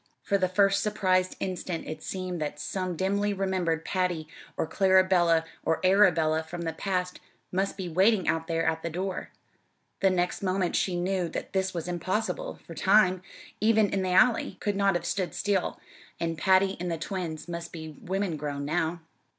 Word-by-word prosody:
For 200 - +1
the 185 -1 +1
first 195 +1 +3
surprised 185 -3 +1
instant 180 -2 -3
it 155 0 -6
seemed 185 -2 -4
that 150 -1 -3
some 185 +4 -3
dimly 200 +3 0
remembered 185 -4 -1
Patty 180 -4 -1 0.3
or - - +1
Clarabella 185 -3 +4 0.2
or 160 - +1
Arabella 175 -5 +4
from 165 +2 -7
the 165 -1 -2
past 180 -2 -2 0.3
must 195 +2 -1
be 190 -2 -4
waiting 190 +3 +3
out 165 0 0
there 165 0 0
at 160 0 0
the 170 - -3
door; 185 +3 -4 0.7
the 195 - +4
next 180 -1 0
moment 185 -2 0
she 185 - +1
knew 180 0 0
that - - -6
this 190 -1 0
was 170 0 -3
impossible, 210 - -2
for - - -9
time, 190 -2 +4 0.4
even 215 -1 +4
in 195 - 0
the 185 - -1
Alley, 195 0 +3
could 205 -1 -1
not 200 -1 +2
have 175 - -2
stood 185 -3 -2
still, 200 -3 0 0.4
and 165 -1 -1
Patty 190 +2 +3
and 175 0 -2
the 165 - -1
twins 165 -2 -4
must 170 -1 -5
be 160 -2 -8
women 190 -3 -2
grown 145 -1 -4
now. 165 +2 -1
185 Hz, 175 wpm, -28 LUFS, 165-195 Hz, 0.7 s, Clarabella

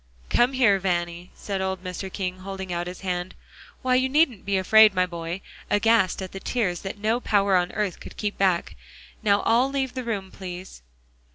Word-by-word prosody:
"Come 245 +3 +3
here, 235 -7 +4
Vanny," 175 -1 -2
said 195 -2 -4
old 190 -1 -2
Mr. 185 +1 -5
King, 185 -1 -4
holding 190 -1 -6
out 175 0 -2
his 180 0 -8
hand. 180 -1 -3 0.5
"Why, 255 0 +2
you 260 +1 +3
needn't 270 - +2
be 200 -1 +2
afraid, 215 +2 +6
my 185 0 +3
boy," 170 +1 -5 0.3
aghast 205 -3 +3
at 185 - -7
the 195 - -7
tears 195 -6 -1
that 195 +1 -6
no 220 +3 +1
power 200 -4 +2
on 180 -1 +2
earth 210 -4 -2
could - - -11
keep 205 -1 -2
back. 185 -3 +1 0.5
"Now 205 -2 +3
all 240 +4 +3
leave 270 -2 -2
the 255 0 -4
room, 200 -5 -3
please." 185 - -8
195 Hz, 190 wpm, -25 LUFS, 180-220 Hz, 0.5 s, afraid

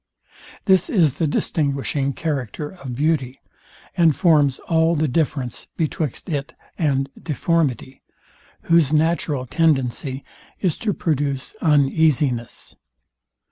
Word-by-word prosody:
This 190 - +3
is 170 - +2
the 160 - +3
distinguishing 140 -2 -1
character 145 -1 -3
of 135 -9 -8
beauty, 140 -2 0 0.6
and 165 -4 +4
forms 150 -6 +3
all 165 0 +3
the 155 0 +1
difference 135 -4 -2
betwixt 155 -4 -2
it 150 -2 -4 0.2
and 135 -4 0
deformity, 150 -4 -1 0.6
whose 165 -4 +3
natural 155 -4 +1
tendency 135 -2 0 0.4
is 180 -6 -1
to 210 -4 -1
produce 140 -4 -2
uneasiness. 145 -5 +1
150 Hz, 100 wpm, -21 LUFS, 135-165 Hz, 0.6 s, and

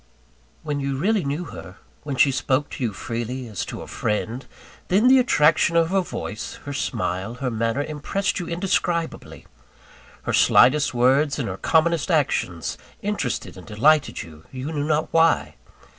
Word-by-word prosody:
When 150 -2 -2
you 135 -1 -2
really 200 +5 +1
knew 145 +5 -2
her, 95 - -10 0.3
when 145 -2 -4
she 135 +1 +4
spoke 135 +2 0
to - - -5
you 115 - 0
freely, 120 +4 -5
as 105 -4 -4
to - - -7
a - - -11
friend 110 +4 -3 0.4
then, 205 +7 +3
the 260 +1 +7
attraction 165 -8 +3
of 165 0 +3
her 195 0 +3
voice, 110 - -6
her 145 - -5
smile 110 -5 -2
her 125 0 -3
manner, 115 +4 0
impressed 155 +8 -2
you 175 - -5
indescribably. 170 -1 -2 0.8
Her - - -2
slightest 135 +1 +5
words 135 +4 +3
and 135 - -2
her 95 - -4
commonest 165 - +2
actions 130 - 0 0.2
interested 200 - -2
and 90 - -12
delighted 145 +8 +2
you, 80 -1 -14
you 130 +4 -5
knew 145 -2 -2
not 155 0 0
why. 165 0 +3
145 Hz, 160 wpm, -23 LUFS, 120-165 Hz, 0.8 s, the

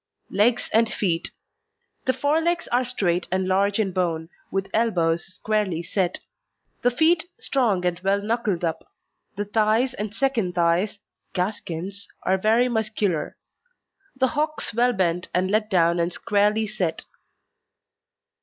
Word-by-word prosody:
LEGS 230 +5 +2
AND 225 0 +4
FEET 170 -5 -1 0.8
The 260 - +3
fore 285 +5 +1
legs 340 +1 0
are 245 +2 +2
straight 185 -8 0
and 185 0 0
large 195 +2 +2
in 210 -4 +1
bone, 170 -3 -1 0.2
with 195 0 -2
elbows 175 -6 +1
squarely 205 -5 -1
set; 180 +1 -1 0.6
the 245 - +4
feet 320 +7 +3
strong 215 -10 +1
and 175 -1 0
well 195 +2 +1
knuckled 210 -4 -1
up; 165 0 -2 0.5
the 205 +1 -2
thighs 220 +5 +2
and 210 -4 -4
second 225 -7 0
thighs 175 +4 +2 0.4
(gaskins) 190 0 -4 0.2
are 190 0 +2
very 225 +5 +3
muscular; 215 -7 -1 0.8
the 260 0 +2
hocks 305 -3 -1
well 245 +3 +3
bent 180 -2 0
and 185 +1 +1
let 215 0 +1
down 170 -3 +3
and 170 +1 +1
squarely 210 +4 +1
set. 200 -6 -2
205 Hz, 135 wpm, -24 LUFS, 180-230 Hz, 0.8 s, AND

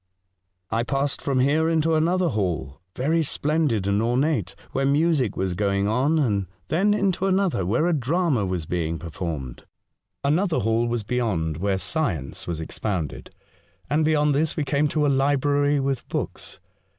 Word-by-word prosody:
I 115 +1 +1
passed 140 +3 -1
from 135 -2 +1
here 155 +4 +2
into 165 0 +2
another 170 +3 +2
hall 85 - -2
— 90 - -49
very 160 +6 +1
splendid 150 -8 0
and 100 +1 +1
ornate 120 - 0
— - - -25
where 135 - -1
music 140 - +2
was 95 -1 -1
going 100 +1 0
on, 130 +9 +2
and 105 - +1 0.2
then 200 +6 +3
into 195 -2 +1
another, 185 - +1
where 120 - +2
a 175 - +2
drama 150 - +1
was 90 -4 -2
being 85 -1 -2
performed. 80 -7 -6 0.6
Another 160 +5 +2
hall 115 +3 +1
was 120 -2 -1
beyond, 100 -10 -1
where 95 +2 0
science 95 - -2
was 85 -2 -3
expounded, 85 -1 -4 0.6
and 155 +2 +3
beyond 150 -1 +3
this 150 +3 0
we 155 - +1
came 145 +2 +1
to 150 +1 0
a - - +3
library 145 +1 +2
with 135 -2 -2
books. - - -5
135 Hz, 165 wpm, -24 LUFS, 100-155 Hz, 0.6 s, then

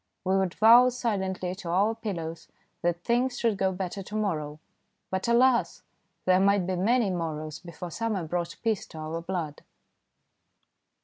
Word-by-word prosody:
We 190 +1 +2
would 190 -2 0
vow 235 +3 +7
silently 190 -7 -2
to 185 -2 -7
our 200 +6 +2
pillows 175 -8 -5 0.3
that 175 0 -1
things 245 +1 +1
should 230 -3 +1
go 190 -1 +1
better 185 +1 -4
to 210 +3 -8
morrow, 155 -8 -2 0.5
but 190 +4 -1
alas! 240 +1 +3 0.4
there 185 0 +5
might 200 -1 +3
be 185 +1 -1
many 215 +3 +2
morrows 155 -3 -4
before 175 0 -8
summer 220 -2 -2
brought 170 +1 -3
peace 220 -4 0
to - - -12
our 155 +2 -4
blood. 170 -4 -4
190 Hz, 150 wpm, -27 LUFS, 170-220 Hz, 0.5 s, vow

